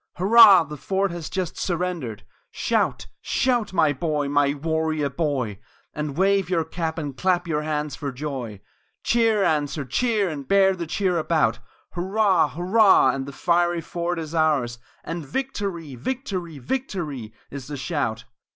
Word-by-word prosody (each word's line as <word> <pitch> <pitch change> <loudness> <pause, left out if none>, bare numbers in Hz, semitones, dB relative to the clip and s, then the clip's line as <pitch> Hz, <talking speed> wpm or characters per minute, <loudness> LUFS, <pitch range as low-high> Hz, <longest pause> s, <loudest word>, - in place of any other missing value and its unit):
Hurrah! 200 -1 +8
the 150 -1 -8
fort 195 +4 -1
has 170 -3 -6
just 185 -3 -3
surrendered! 175 - -3 0.3
Shout! - - -1 0.2
Shout! 245 -5 0
my 160 -5 +3
boy, 150 0 -1
my 145 0 +2
warrior 155 -1 -1
boy! 130 - -2 0.3
And 150 -1 -4
wave 195 -1 +2
your 170 -3 +1
cap 160 0 -4
and 145 -4 -4
clap 180 +1 +1
your 150 -2 0
hands 150 -1 -2
for 140 -2 -4
joy! 125 -7 -6 0.4
Cheer 225 -3 +2
answer 150 -3 0
cheer 215 - +1
and 145 -5 -6
bear 195 -1 +4
the 170 -2 -5
cheer 180 0 0
about 155 -8 +1 0.3
Hurrah! 190 -1 +2
Hurrah! 180 - +4
for 135 - -4
the 140 - -7
fiery 175 +3 +1
fort 170 +1 -3
is 160 -1 -5
ours; 145 -7 +1 0.2
And 165 0 -5
"Victory!" 185 - -4
"Victory!" 180 - -4
"Victory!" 150 - -4 0.2
Is 140 -2 -7
the 145 -1 -5
shout. 130 -7 -2
165 Hz, 150 wpm, -24 LUFS, 145-185 Hz, 0.4 s, Hurrah